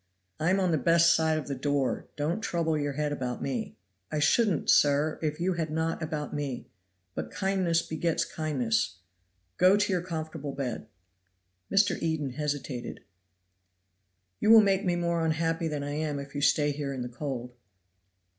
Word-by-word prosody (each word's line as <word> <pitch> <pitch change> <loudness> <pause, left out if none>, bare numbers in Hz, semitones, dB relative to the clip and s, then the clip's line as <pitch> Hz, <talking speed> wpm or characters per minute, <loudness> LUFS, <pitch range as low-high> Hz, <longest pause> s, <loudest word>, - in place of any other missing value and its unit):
"I 160 - +1
am 190 +1 +3
on 185 -2 +2
the 160 - +2
best 170 +3 +5
side 160 -1 +2
of 155 - -4
the 140 - -2
door; 140 0 -1
don't 155 +8 -1
trouble 165 -6 0
your 145 -1 -1
head 150 +1 -1
about 125 -4 -3
me." 135 -2 -3 0.4
"I 155 - -1
shouldn't, 200 +4 +2
sir, 145 +2 +4
if 150 -1 -2
you 185 +2 +1
had 165 -2 -2
not 160 +2 -1
about 155 -2 -4
me 145 -4 -4 0.4
but - - -4
kindness 185 -4 +1
begets 160 +1 -1
kindness. 120 - -1 0.6
Go 185 +3 +6
to 205 -1 +1
your 180 - +1
comfortable 160 -4 -5
bed." 130 -4 -4 0.8
Mr. 195 -2 +3
Eden 160 -4 -1
hesitated. 145 -3 -4 1.4
"You - - +1
will 225 0 +10
make 195 -1 +2
me 180 -3 +1
more 170 -1 0
unhappy 165 +1 0
than 150 -2 -3
I 145 - -4
am, 150 0 -2
if 140 0 -7
you 145 - -3
stay 145 0 +3
here 145 -1 -3
in 130 -2 -4
the - - -4
cold." 125 -1 -5
155 Hz, 170 wpm, -28 LUFS, 145-170 Hz, 1.4 s, will